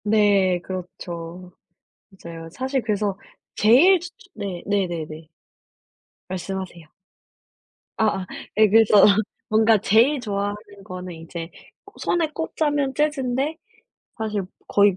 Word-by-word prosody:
네. 205 -4 +3
그렇죠. 180 -1 -7 0.6
맞아요. 165 -3 -9
사실 260 - -2
그래서 205 -3 -1 0.4
제일 280 - +6
츠 350 +1 -8
츠 380 - -21
네. 195 -5 -5
네네네. 165 -6 -2 1.0
말씀하세요. 185 -2 -5 1.1
아아 210 -4 +1 0.3
예 215 -1 +6
그래서 215 -1 +6 0.4
뭔가 220 +1 +5
제일 230 +9 +4
좋아하는 205 -2 -2 0.3
거는 185 -2 -7
이제 165 0 -7 0.5
손에 335 -3 0
꼽자면 290 -4 -1
재즈인데 295 0 0 0.6
사실 215 -2 -2 0.3
거의 200 -2 +4
205 Hz, 225 characters per minute, -23 LUFS, 180-240 Hz, 1.1 s, 제일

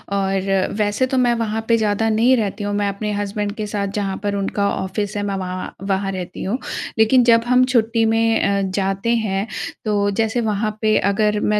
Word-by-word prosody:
और 195 -1 0
वैसे 210 +4 +1
तो 260 - -1
मैं 245 -1 +3
वहाँ 225 -1 -2
पे 230 - +4
ज़्यादा 220 0 +1
नहीं 230 +4 +4
रहती 210 -1 -2
हूँ। 205 0 -2
मैं 205 0 0
अपने 210 +2 -3
हस्बैंड 205 0 -2
के 215 -2 -3
साथ 200 -1 -2
जहाँ 195 -2 -2
पर 205 0 -1
उनका 200 0 -1
ऑफ़िस 200 +2 -3
है, 205 - -1
मैं 200 -1 -2
वहाँ 185 -1 -5 0.2
वहाँ 195 0 0
रहती 180 -2 -6
हूँ। 210 +7 -1 0.4
लेकिन 240 +3 +5
जब 230 -1 +5
हम 250 +1 +5
छुट्टी 230 -2 +2
में 225 0 +2
अ, 200 0 +1
जाते 195 +2 -1
हैं, 205 -2 -1 0.4
तो 205 -1 +1
जैसे 225 +2 +1
वहाँ 215 -1 -1
पे 215 0 +3
अगर 210 +1 +1
मैं 210 0 +1
210 Hz, 200 wpm, -20 LUFS, 195-225 Hz, 0.4 s, लेकिन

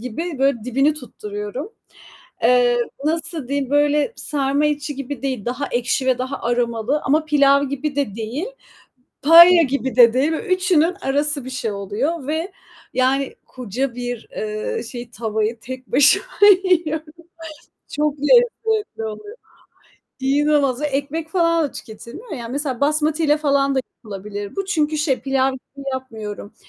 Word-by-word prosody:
gibi, 280 +7 -5
böyle, 270 -5 +1
dibini 275 +5 +2
tutturuyorum. 245 - -7 0.7
Eee, 245 -1 +4 0.3
nasıl 315 -3 -2
diyeyim? 280 -2 -2
Böyle, 290 +6 +2
sarma 285 0 0
içi 295 -1 -2
gibi 275 +1 -6
değil, 260 -7 -3
daha 255 +4 -3
ekşi 245 +2 -1
ve 255 -1 +2
daha 260 +2 -4
aromalı 240 +3 0
ama 305 +3 +2
pilav 280 -2 +4
gibi 280 +1 -4
de 275 -8 -1
değil, 230 - -4 0.8
paella 340 +3 +9
gibi 265 -3 -2
de 240 -2 +8
değil. 270 +6 +1
Üçünün 365 -2 +1
arası 285 0 0
bir 260 - -7
şey 245 -4 -3
oluyor 250 - -3
ve, 320 +5 -2 0.4
yani, 265 +1 +1
koca 250 +1 -4
bir, 245 -2 -5
eee, 215 0 -3
şey 240 0 -8
tavayı 220 0 -2
tek 255 +4 -8
başıma 290 +9 +5 0.4
yiyorum. 320 -4 0 0.8
Çok 300 0 -1
lezzetli 445 - +2
oluyor. 410 - -7 0.8
İnanılmaz, 280 -1 +2
ekmek 295 +2 -2
falan 335 -1 +2
da 290 - -2
tüketilmiyor 240 - -10
ya. 240 -7 -5
Mesela 265 0 -3
basmatiyle 305 +1 +2
falan 280 -2 +1
da - - +3 0.2
yapılabilir 205 -1 -7
bu 390 - -2
çünkü 310 -5 0
şey, 290 -4 0
pilav 270 +1 +1
gibi 275 +1 -12
yapmıyorum, 220 -5 -7
275 Hz, 135 wpm, -20 LUFS, 245-305 Hz, 0.8 s, paella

